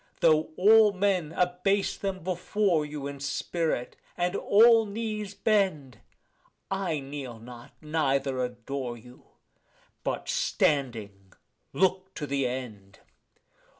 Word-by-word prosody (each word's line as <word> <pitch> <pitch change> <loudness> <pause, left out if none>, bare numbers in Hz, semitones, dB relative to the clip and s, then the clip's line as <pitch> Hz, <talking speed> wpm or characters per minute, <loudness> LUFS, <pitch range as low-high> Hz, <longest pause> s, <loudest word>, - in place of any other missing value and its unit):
Though 155 -1 +4
all 215 +2 +6
men 185 -5 0
abase 180 +3 +1
them 190 -3 -4
before 185 -1 0
you 145 -2 -6
in 140 0 -6
spirit, 140 -1 -2 0.2
and 175 +2 0
all 225 +2 +5
knees 210 -1 -4
bend, 190 - 0 0.7
I 190 -6 -1
kneel 135 -3 -7
not 120 +1 -12
neither 140 -4 0
adore 125 0 -5
you, 125 +2 -16 0.8
but - - -3
standing, 120 - -1 0.4
look 190 0 0
to 150 - -4
the 140 -2 0
end. 110 -6 -7
155 Hz, 110 wpm, -28 LUFS, 130-195 Hz, 0.8 s, all